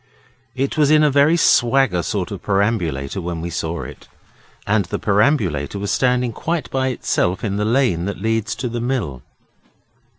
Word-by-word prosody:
It 135 +3 -2
was 150 -2 +4
in 155 0 +5
a 150 - +4
very 145 +4 +4
swagger 130 - +3
sort 100 -1 -3
of 100 - -6
perambulator 95 -7 -1
when 85 -1 -4
we 85 +1 -5
saw 80 +1 -3
it; - - -11 0.6
and 105 -2 +1
the - - -3
perambulator 100 - +1
was 100 0 -3
standing 125 -1 +1
quite 165 +6 -3
by 130 0 0
itself 95 -7 -1
in 100 -2 -1
the 105 - 0
lane 110 -8 +1
that 100 - -4
leads 110 0 -1
to 125 - -3
the 120 0 -4
mill. 115 - -2
110 Hz, 170 wpm, -20 LUFS, 90-130 Hz, 0.6 s, in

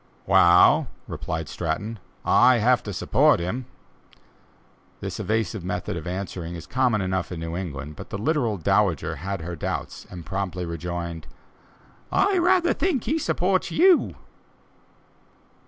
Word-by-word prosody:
"Wa'al," 85 +1 +6 0.2
replied 80 -1 -4
Stratton, 100 +9 -3 0.3
"I 125 0 +5
have 120 +2 +3
to 105 - -6
support 90 - +3
him!" 115 +9 -3 1.3
This - - -5
evasive 110 -3 -1
method 90 0 -3
of 85 0 -6
answering 90 -2 -5
is 85 - -8
common 125 -5 +1
enough 95 -1 -2
in 90 - -5
New 80 0 -4
England, 75 -5 -5
but - - -9
the - - -4
literal 120 -2 0
dowager 80 - +1
had 95 0 -4
her 85 +2 -5
doubts, 75 - -5
and 85 -3 -9
promptly 90 -2 -3
rejoined: 85 -1 -5 0.8
"I 390 -2 +3
rather 350 0 +3
think 325 - 0
he 320 +3 0
supports 185 - 0
you!" 360 0 +4
95 Hz, 135 wpm, -24 LUFS, 85-125 Hz, 1.3 s, Wa'al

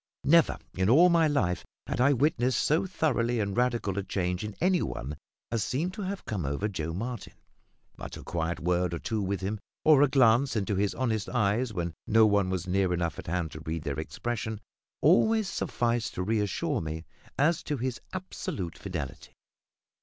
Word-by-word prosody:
Never 165 +3 +5 0.2
in 95 +2 +1
all 165 +9 +7
my 165 -2 +4
life 130 - 0 0.2
had - - -2
I 140 +3 +5
witnessed 130 -3 +2
so 160 +5 +2
thorough 155 -8 0 0.2
and 100 -2 -1
radical 120 -5 0
a - - -3
change 90 -1 -2
in 105 -1 -5
any 185 0 +3
one 70 +5 -4 0.4
as 115 -3 0
seemed 165 +8 -1
to 205 - -6
have 195 0 -4
come 100 -6 -3
over 70 +9 -1
Joe 80 -6 -3
Martin. 115 +5 -5 0.6
But - - -7
a - - -10
quiet 85 0 -2
word 90 0 0
or - - -3
two 110 +5 -2
with 95 0 -2
him, 100 +3 -2 0.3
or 155 -3 +7
a 145 - +6
glance 130 -1 +4
into 105 -1 0
his 100 +1 0
honest 110 -5 -1
eyes 115 +1 +1
when 85 -4 -3
no 110 +1 +6
one 100 -3 +3
was 95 -2 -2
near 95 0 +1
enough 85 -2 -2
at - - -9
hand 85 -2 -1
to 75 - -8
read 80 0 -4
their 70 -2 -3
expression, 110 +5 -4 0.4
always 215 +7 +4
sufficed 120 -7 -1
to 90 - -1
reassure 105 -1 0
me 80 +1 -5 0.3
as 165 +4 +3
to 150 -3 -3
his 125 0 -3
absolute 145 - -5
fidelity. 85 -9 -6
110 Hz, 185 wpm, -28 LUFS, 90-135 Hz, 0.6 s, all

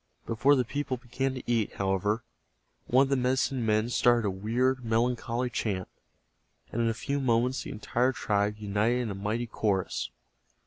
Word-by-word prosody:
Before 120 +6 +3
the 125 -2 +1
people 140 +1 -2
began 130 +2 -2
to 130 - -6
eat, 115 -3 0
however, 100 +3 0 0.6
one 130 +2 +5
of 135 - -2
the 140 - +3
medicine 130 0 +1
men 110 0 +2
started 120 -3 +3
a - - +1
weird, 125 +7 0
melancholy 120 +1 0
chant, 100 -6 -2 0.8
and 120 - -1
in 115 - +2
a 115 - -1
few 140 +6 -2
moments 125 0 +1
the - - -7
entire 120 +4 0
tribe 105 -3 0
united 105 +4 +1
in 115 -4 -3
a - - -3
mighty 105 +5 -2
chorus. 100 -4 -1
120 Hz, 170 wpm, -29 LUFS, 105-125 Hz, 0.8 s, one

